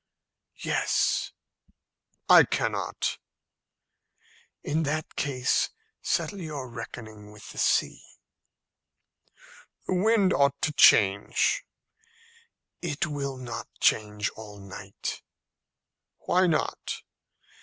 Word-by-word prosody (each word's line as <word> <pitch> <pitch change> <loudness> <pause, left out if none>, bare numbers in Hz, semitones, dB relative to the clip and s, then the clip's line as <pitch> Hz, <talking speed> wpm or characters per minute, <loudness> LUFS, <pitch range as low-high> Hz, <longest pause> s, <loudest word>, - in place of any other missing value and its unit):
"Yes." - - +1 1.0
"I - - +9
cannot." - - -2 1.4
"In 155 +3 0
that 155 0 -2
case 130 -3 +1 0.3
settle 200 -2 -1
your 150 -5 -5
reckoning 110 -3 -9
with 105 -1 -12
the - - -8
sea." - - +2 1.8
"The - - -1
wind 200 0 +3
ought 140 0 +2
to 150 - +1
change." 100 -6 +4 1.2
"It 160 -3 -1
will 140 -3 -4
not 120 -3 -6
change 105 -1 +1
all 105 -2 -11
night." 100 0 -7 1.0
"Why 185 +1 +3
not?" 160 -3 -2
135 Hz, 85 wpm, -27 LUFS, 105-155 Hz, 1.8 s, I